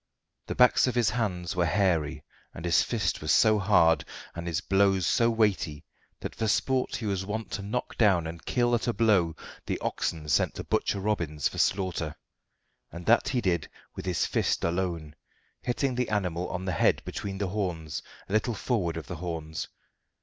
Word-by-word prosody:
The - - -3
backs 125 +1 +5
of 125 - -1
his 120 -3 +3
hands 90 -8 -2
were 85 -1 +2
hairy, 80 -6 +1 0.3
and 80 - -7
his 85 -2 +4
fist - - -1
was 75 - 0
so 110 -1 +5
hard, 85 -6 +4 0.3
and 85 +1 -6
his 85 -1 0
blows 95 -1 +2
so 115 +7 +3
weighty, 100 -10 0 0.4
that - - -5
for 110 - -2
sport 130 +5 +1
he 115 - -4
was 100 -2 -1
wont 110 +3 -4
to 100 - -3
knock 110 +5 -4
down 95 -7 +4
and 80 +1 -7
kill 120 -1 +1
at 120 +1 +1
a 120 - +2
blow 100 -9 +3 0.3
the - - -1
oxen 80 -2 -3
sent 70 - +2
to - - -5
Butcher 100 - 0
Robbins 85 -8 0
for - - -6
slaughter, 90 -5 0 0.8
and 85 +1 -8
that 115 +2 +4
he 125 -2 0
did 85 -6 0 0.3
with - - -6
his 90 - +1
fist - - 0
alone, 85 -3 -1 0.5
hitting 130 +2 0
the 125 0 -1
animal 90 -4 -1
on 90 +1 -4
the 95 - -1
head 80 - +2
between 100 -1 -5
the 100 -1 -2
horns, 85 -8 -3 0.3
a - - -6
little 110 +2 +1
forward 95 -8 -1
of 80 - -6
the 85 - -6
horns. 80 -2 -4
95 Hz, 185 wpm, -28 LUFS, 85-110 Hz, 0.8 s, backs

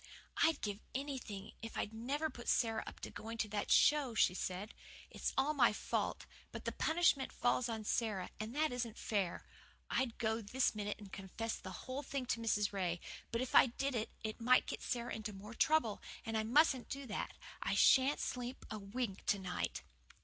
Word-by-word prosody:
"I'd 320 -3 +4
give 205 -1 -2 0.2
anything 255 -8 -4
if 225 0 -6
I'd 210 - -2
never 280 +8 -1
put 240 - -6
Sara 225 -2 +2
up - - -9
to - - -6
going 225 +1 -6
to 220 - 0
that 205 0 -2
show," 285 -6 +5
she 180 - +5
said. 185 +3 -3 0.4
"It's - - -2
all 275 +3 +3
my 245 -7 +5
fault - - -1 0.3
but - - -7
the - - 0
punishment 320 -5 +2
falls 245 0 +1
on 220 -1 -3
Sara, 210 -4 -1
and 220 +4 -4
that 310 -1 +2
isn't 240 -2 -3
fair. 200 -5 -1 0.5
I'd 260 -3 0
go 220 0 0
this 245 +5 +1
minute 205 -1 -3
and 200 -3 -12
confess 205 +4 -4
the 190 - -8 0.2
whole 260 +2 -3
thing 275 -2 -3
to - - -4
Mrs. 210 -3 +1
Ray; 180 -3 0 0.3
but 230 +1 0
if 255 - -3
I - - +9
did 275 +3 -2 0.3
it 220 +1 -4
might 250 +2 +5
get - - -4
Sara 240 -1 -2
into 215 -1 -4
more 205 +3 -9
trouble, 235 -5 +2 0.2
and 225 - -2
I 220 - +3
mustn't 265 +1 +4
do 275 0 -4
that. 225 - -3 0.3
I - - 0
sha'n't 265 +2 +6
sleep 250 +1 -4
a 215 - -3
wink 200 0 -3
to 200 - +4
night." 185 -2 -3
230 Hz, 195 wpm, -37 LUFS, 210-260 Hz, 0.5 s, I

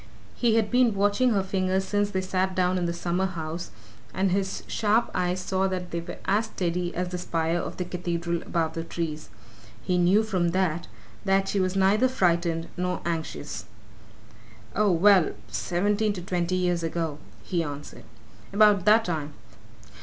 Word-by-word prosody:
He 235 -2 +2
had 220 -2 +1
been 245 -4 +4
watching 205 +6 +3
her 200 -4 +2
fingers 190 0 0
since 205 +1 0
they 190 -2 -1
sat 185 0 -1
down 185 0 +2
in 175 - -1
the - - 0
summer 175 +2 -1
house, 165 -3 -5 0.5
and 190 -1 +1
his 190 0 -1
sharp 220 +2 +1
eyes 180 0 0
saw 190 +1 0
that 180 -2 -4
they 170 - -2
were 170 +1 -8
as 210 +3 +2
steady 175 -4 -2
as 180 0 -1
the 180 0 -4
spire 165 -1 0
of - - -5
the 180 - -2
cathedral 170 -1 -2
above 165 -2 -1
the 165 - -4
trees 160 -2 -4 0.5
he 180 -1 +1
knew 185 +5 +4
from 190 -5 0
that 175 -2 0 0.4
that 195 -1 +2
she 200 - 0
was 185 0 0
neither 200 +6 +4
frightened 170 -7 +1
nor 180 0 -1
anxious. 165 -2 -4 1.1
"Oh, 210 -1 +3
well 185 0 +5 0.2
seventeen 205 +4 0
to 185 - -6
twenty 180 -1 -1
years 180 -2 +1
ago," 165 -2 -2 0.2
he 175 -2 -1
answered. 145 -2 -7 0.5
"About 205 -2 +5
that 220 +2 +5
time. 155 -4 -3
185 Hz, 170 wpm, -26 LUFS, 170-195 Hz, 1.1 s, well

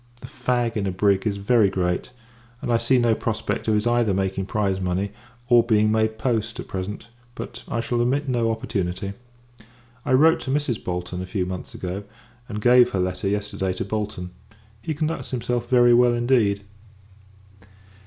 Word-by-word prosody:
The - - -8
fag 120 -2 -1
in 100 -2 -1
a - - 0
brig 100 +2 +2
is 100 -1 -1
very 100 +1 +3
great; 90 +1 -1 0.5
and 120 - -1
I 115 - +3
see 115 +3 +3
no 120 -2 +3
prospect 110 0 -2
of 110 - +3
his 105 +1 +1
either 120 -4 +2
making 95 0 -1
prize 100 -3 0
money, 95 +2 -1 0.4
or 120 -1 +6
being 110 -2 +3
made 110 0 +1
post, 115 -1 -1
at - - -6
present: 95 +3 -5 0.3
but, - - -7
I 115 - -1
shall 120 +1 -1
omit 140 +4 +1
no 120 -3 +1
opportunity. 100 -3 -2 0.9
I 135 - 0
wrote 160 +5 +5
to - - -7
Mrs. 145 -5 -1
Bolton 90 0 -4
a 90 - -6
few 90 -1 -1
months 90 0 -6
ago; 95 +2 -4 0.5
and 105 0 -5
gave 125 0 +6
her 95 - -2
letter, 90 +1 -1
yesterday, 100 -2 -1
to - - -4
Bolton. 100 -3 -4 0.5
He 155 +7 -3
conducts 155 +2 -2
himself 120 -1 -2
very 120 -1 +6
well, 120 0 +5
indeed. 120 -5 +2
110 Hz, 175 wpm, -23 LUFS, 95-120 Hz, 0.9 s, or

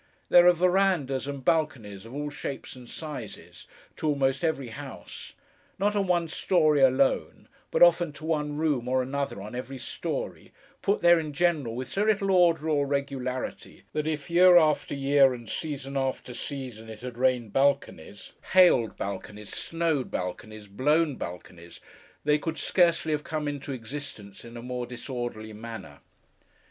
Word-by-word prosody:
There 175 0 +7
are 180 - +8
verandahs 175 -7 +1
and 140 -2 -6
balconies, 115 -11 0
of 120 - -10
all 145 0 -3
shapes 140 -2 -6
and 125 -2 -12
sizes, 150 -9 -8 0.3
to 155 - -2
almost 135 0 +1
every 140 -6 -1
house—not 205 - -6
on 200 -2 +1
one 175 -2 +2
story 155 -3 +2
alone, 135 +1 +2 0.2
but - - +4
often 175 -1 +5
to 155 - -9
one 150 -2 -1
room 145 -6 0
or 130 0 +2
another 140 -5 -3
on 105 - -8
every 130 +2 -5
story—put 200 - -4
there 175 -1 +7
in 155 -2 -5
general 150 -8 +1
with 130 +1 -4
so 200 - -1
little 200 -2 +2
order 170 -4 +4
or 145 -3 +1
regularity, 135 -2 -4
that 150 0 -1
if, 150 -2 -3
year 180 +1 +7
after 155 -3 +2
year, 135 -1 +4
and 120 -2 -11
season 140 -3 -5
after 135 -2 -2
season, 120 -4 -7
it 110 -1 -9
had 125 -1 -6
rained 125 -3 +1
balconies, 135 - 0 0.2
hailed 175 -12 +5
balconies, 100 +1 -6
snowed 165 -5 -1
balconies, 105 +4 -5
blown 145 +10 +1
balconies, 85 -2 -9 0.4
they 150 0 +3
could 160 +1 -4
scarcely 170 0 +2
have 150 -1 -1
come 155 -1 -3
into 145 -1 -4
existence 115 -5 -7
in 120 0 -10
a 120 - -8
more 125 -1 -4
disorderly 120 -3 -6
manner. 105 - -9
140 Hz, 155 wpm, -27 LUFS, 120-160 Hz, 0.4 s, are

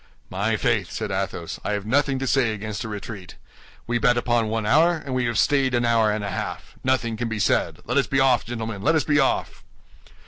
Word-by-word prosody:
"My 105 +4 0
faith," 110 -6 0
said 105 +2 -4
Athos, 95 -3 -3
"I 105 - -1
have 105 -1 -3
nothing 135 +3 +1
to 135 - -3
say 130 -3 +2
against 105 +2 -5
a - - -5
retreat. 105 -3 -7 0.5
We 120 0 0
bet 120 0 +3
upon 120 -2 +1
one 110 0 -2
hour, 160 +9 +4
and 140 -5 -6
we 125 -1 0
have 120 -2 -1
stayed 135 -1 +2
an 120 0 +1
hour 115 -2 +3
and 105 0 -2
a 100 - -3
half. - - -5
Nothing 125 -3 0
can 120 0 -2
be 110 - -3
said; 105 - 0
let 125 +4 -1
us 140 - +3
be 135 - +1
off, 130 -5 +4
gentlemen, 110 -3 -5
let 160 +9 +2
us 155 - +2
be 150 -1 +2
off!" 135 - 0
115 Hz, 230 wpm, -23 LUFS, 105-130 Hz, 0.5 s, hour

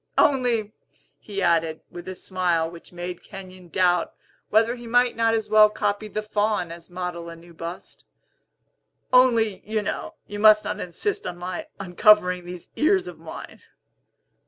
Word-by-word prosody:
Only," 240 -6 +2 0.5
he 200 -2 -4
added, 165 -2 +1
with 175 +1 -9
a 185 - -5
smile 180 -4 0
which 170 0 -12
made 175 0 -6
Kenyon 185 -3 -11
doubt 175 -1 +1 0.3
whether 225 +2 +3
he 240 -1 -10
might 245 +1 +3
not 225 0 +2
as 220 -1 -2
well 215 0 +7
copy 205 0 -2
the 215 0 -4
Faun 210 -4 0
as 170 +1 -11
model 175 -1 -5
a 165 - -8
new 170 +1 -16
bust, 170 +2 -8 1.1
"only, 230 -5 +4
you 215 0 -2
know, - - -4
you 205 0 -7
must 215 0 +6
not - - -3
insist 410 - -3
on 175 - -5
my 185 - -5
uncovering 180 -1 +4
these 175 -1 -9
ears 370 +4 +3
of - - -9
mine!" - - -10
195 Hz, 160 wpm, -24 LUFS, 175-220 Hz, 1.1 s, well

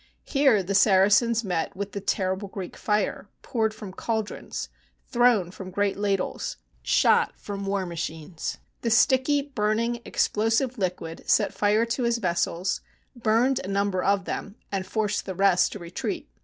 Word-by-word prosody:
Here 270 -8 +3
the 195 +2 -2
Saracens 205 +4 +4
met 175 -5 -2
with 200 +1 -4
the 200 - -5
terrible 190 0 -1
Greek 190 -2 -7
fire, 210 -1 -1
poured 220 -3 0
from 210 -3 -9
caldrons, 220 +1 -3 0.4
thrown 240 -8 +3
from 190 -1 -8
great 200 +1 0
ladles, 200 -2 -2 0.2
shot - - +3
from 200 -1 -5
war 195 -1 0
machines. 165 -1 -5 0.2
The 235 - 0
sticky, 260 +4 +4
burning, 230 -2 -1
explosive 225 +3 +1
liquid 175 -3 -4
set - - +3
fire 210 +2 +2
to 235 +3 -2
his 235 -1 +2
vessels, 180 -2 -1 0.3
burned 240 +3 +2
a - - -6
number 200 -1 0
of 200 -1 +2
them, 205 - -5 0.2
and 195 -2 -2
forced 210 -2 -1
the 190 - -4
rest 190 -1 +3
to - - -6
retreat. 170 -2 -4
205 Hz, 150 wpm, -26 LUFS, 190-230 Hz, 0.4 s, Saracens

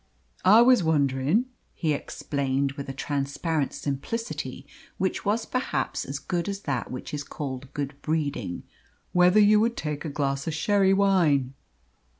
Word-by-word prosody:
"I 215 +5 +8
was 250 -5 +5
wondering," 145 - +2 0.3
he 160 -4 0
explained, 140 -1 -2
with 140 0 -7
a - - -1
transparent 140 +2 -2
simplicity 190 - -4 0.3
which 190 - -1
was 215 +3 +1
perhaps 255 0 -2
as 135 +1 -4
good 175 +5 -2
as 200 0 -4
that 135 - -2
which 125 - -7
is 145 -1 -3
called 135 -2 -6
good 145 0 -3
breeding, 150 - -2 0.5
"whether 180 +3 +5
you 210 0 +6
would 230 +2 +1
take 150 -2 -3
a 160 - -3
glass 140 0 -2
of 160 - -1
sherry 195 +2 +3
wine." 175 -10 +3
150 Hz, 150 wpm, -26 LUFS, 140-195 Hz, 0.5 s, I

